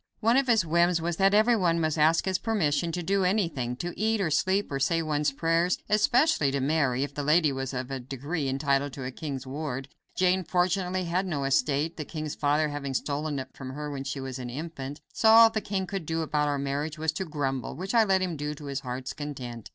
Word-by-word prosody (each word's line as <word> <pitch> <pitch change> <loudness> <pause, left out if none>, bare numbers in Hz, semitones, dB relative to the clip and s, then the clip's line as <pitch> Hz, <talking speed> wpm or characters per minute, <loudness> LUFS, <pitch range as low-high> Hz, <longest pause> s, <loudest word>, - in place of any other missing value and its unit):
One 230 +2 +3
of 270 0 +3
his 225 -7 +3
whims 170 +1 +3
was 165 0 -2
that 195 +1 +4
everyone 210 -7 +3
must 155 -2 0
ask 160 +2 +4
his 190 -2 0
permission 170 -7 0
to 175 +1 -3
do 195 +2 +1
anything; 165 - 0
to 175 +7 -5
eat, 220 +2 +1
or 175 -5 0
sleep, 190 +5 +1
or 135 - -2
say 165 +5 +1
one's 150 -2 0
prayers; 165 +4 +1
especially 235 - +3
to 140 +1 -1
marry, 135 -2 +1
if 140 0 -5
the 145 - -3
lady 150 +1 +3
was 135 -1 -3
of 130 0 -4
a 135 - -3
degree 140 +4 -3
entitled 140 0 0
to 140 - -7
be - - -4
a 130 - -4
king's 135 -1 -5
ward. 135 -1 -5 0.3
Jane, 185 0 +3
fortunately, 180 +2 0
had 180 +2 -1
no 145 -6 -2
estate, 145 +3 +1
the 155 - -3
king's 155 0 -5
father 150 +1 +1
having 140 -2 -4
stolen 145 +2 -2
it 130 -1 -5
from 130 -1 -8
her 150 +1 -5
when 135 -1 -4
she 140 0 -4
was 130 -1 -5
an 125 -1 -5
infant; 145 0 -6
so 220 - +3
all 225 0 +8
the 220 -1 -1
king 195 -1 -2
could 190 -4 -5
do 165 0 -1
about 150 -1 0
our 145 -1 0
marriage 140 +3 -3
was 160 0 0
to 160 - -3
grumble, 135 -7 -3
which 190 +5 -5
I 230 -1 +6
let 190 -3 +2
him 180 -3 -2
do 150 0 -4
to 145 - -11
his 140 -1 -3
heart's 130 -1 -5
content. 125 -6 -7
155 Hz, 235 wpm, -27 LUFS, 140-180 Hz, 0.3 s, all